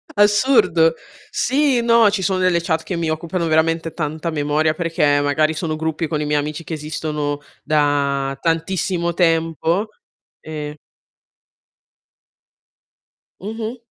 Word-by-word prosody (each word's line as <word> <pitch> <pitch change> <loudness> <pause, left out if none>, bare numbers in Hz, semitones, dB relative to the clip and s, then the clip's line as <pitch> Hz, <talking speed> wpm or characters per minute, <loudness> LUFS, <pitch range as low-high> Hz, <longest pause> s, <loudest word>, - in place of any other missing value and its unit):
assurdo. 205 -6 +4 0.4
Sì, 270 -1 +2
no, 230 -2 +5
ci 200 -2 -1
sono 190 0 0
delle 180 -2 +2
chat 160 -1 -1
che 185 - -4
mi 165 -1 -1
occupano 165 +2 -2
veramente 165 +1 +1
tanta 155 +1 -3
memoria, 155 0 +1
perché 155 -3 +1
magari 155 +2 +1
sono 155 0 -3
gruppi 160 +1 -2
con 150 -1 -2
i - - -1
miei 150 0 +1
amici 150 +2 -4
che 165 - -6
esistono 150 -1 -3 0.2
da 140 -2 +1
tantissimo 170 +1 0
tempo, 165 +3 +1 0.5
e 150 -1 -6 2.6
Mh-mh. 225 +4 -5
160 Hz, 120 wpm, -20 LUFS, 150-180 Hz, 2.6 s, no